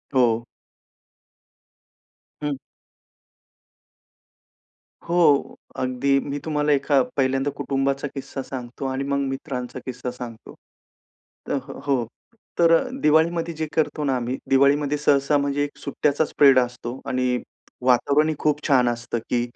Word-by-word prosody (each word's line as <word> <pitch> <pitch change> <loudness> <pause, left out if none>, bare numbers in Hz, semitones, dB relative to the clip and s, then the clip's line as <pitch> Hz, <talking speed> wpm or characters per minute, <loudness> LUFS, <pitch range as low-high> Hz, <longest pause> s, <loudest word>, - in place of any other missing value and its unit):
हो. 120 -3 +3 2.0
हं. 145 -1 -1 2.5
हो, 165 -5 +3 0.2
अगदी 130 +2 +1
मी 140 +1 -4
तुम्हाला 150 -1 +1
एका 140 0 +3 0.2
पहिल्यांदा 135 +1 +1
कुटुंबाचा 135 +1 -1
किस्सा 135 0 -5
सांगतो 125 0 -7
आणि 130 +1 -2
मग 140 0 -1
मित्रांचा 130 -2 -5
किस्सा 125 -1 -5
सांगतो. 120 -2 -9 1.0
अ, - - 0 0.3
हो. 130 -4 +1 0.5
तर 165 -1 +6 0.3
दिवाळीमध्ये 165 +2 +2
जे 155 0 -3
करतो 155 -1 0
ना, 135 -2 +1
आम्ही 125 +1 -2
दिवाळीमध्ये 140 +2 +3
सहसा, 145 0 +3
म्हणजे 140 0 0
एक 145 - -6
सुट्ट्याचा 145 +2 0
स्प्रेड 135 -3 +5
असतो 125 0 -3
आणि 125 -1 +1 0.5
वातावरणही 145 +5 +3
खूप 150 -1 +1
छान 125 -4 +4
असतं, 120 0 -3
की 120 - +1
140 Hz, 115 wpm, -23 LUFS, 125-145 Hz, 2.5 s, तर